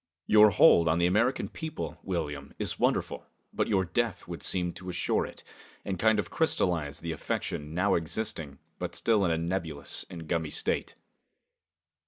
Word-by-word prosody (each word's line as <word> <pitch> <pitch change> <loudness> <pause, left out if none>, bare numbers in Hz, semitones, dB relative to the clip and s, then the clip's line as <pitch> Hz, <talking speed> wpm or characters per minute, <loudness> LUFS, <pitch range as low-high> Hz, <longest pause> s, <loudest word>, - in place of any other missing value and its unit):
Your 105 0 +7
hold 85 -3 +6
on 80 +1 +3
the 85 - +3
American 110 +9 +2
people, 160 -2 -6
William, 75 -6 -4
is - - -2
wonderful, - - 0 0.3
but - - 0
your 95 -3 +2
death 115 +4 -1
would 85 -1 -6
seem 90 -2 0
to 95 - -8
assure 90 - 0
it, - - -11 0.4
and 95 -3 -3
kind 110 +1 +4
of 105 - -2
crystallize 85 - 0
the 85 - -3
affection 75 0 -3
now 100 +3 +2
existing, 80 -4 -1 0.2
but - - -4
still 110 -3 +2
in - - +2
a 80 - +1
nebulous 85 -3 -3
and 85 -3 -8
gummy 80 -2 -1
state." - - 0
90 Hz, 165 wpm, -29 LUFS, 80-100 Hz, 0.4 s, Your